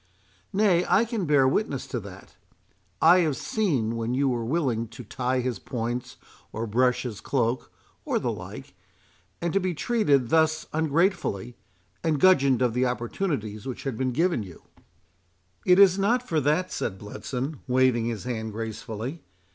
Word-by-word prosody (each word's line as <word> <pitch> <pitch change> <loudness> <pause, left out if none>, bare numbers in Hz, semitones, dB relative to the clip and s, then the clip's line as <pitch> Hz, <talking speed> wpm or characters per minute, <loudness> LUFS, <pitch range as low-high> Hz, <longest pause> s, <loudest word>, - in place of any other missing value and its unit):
"Nay, 195 -4 +3
I 235 - +4
can 225 -5 -2
bear 140 -3 +4
witness 135 -2 0
to 120 - -4
that. 95 -2 -12 0.7
I 180 - +7
have 155 -6 +1
seen 135 - 0
when 115 +2 -2
you 135 +1 +2
were 120 -2 -1
willing 120 -4 0
to 115 +3 -10
tie 125 +3 -1
his 125 -2 -3
points 120 0 -4 0.3
or 110 +2 -3
brush 125 +3 +2
his 110 -5 -6
cloak, 125 -2 -1 0.3
or - - 0
the - - -1
like—and 170 -1 -9
to 195 - +3
be 185 -2 -2
treated 145 - +2
thus 160 -1 +2
ungratefully—and 125 - -1
gudgeoned 140 -8 +5
of 120 -2 +1
the 125 +1 +2
opportunities 120 - -3
which 130 - -5
had 135 -4 -3
been 130 +2 -1
given 165 0 +1
you"— 95 -5 -11 1.0
"It 180 0 +6
is 195 -1 +6
not 240 +5 +1
for 160 -2 +1
that," 150 +6 +1
said 95 - -3
Bletson, 130 +8 -5
waving 125 -2 +3
his 115 -4 -3
hand 110 -3 -4
gracefully. 115 +6 -5
130 Hz, 155 wpm, -26 LUFS, 115-165 Hz, 1.0 s, I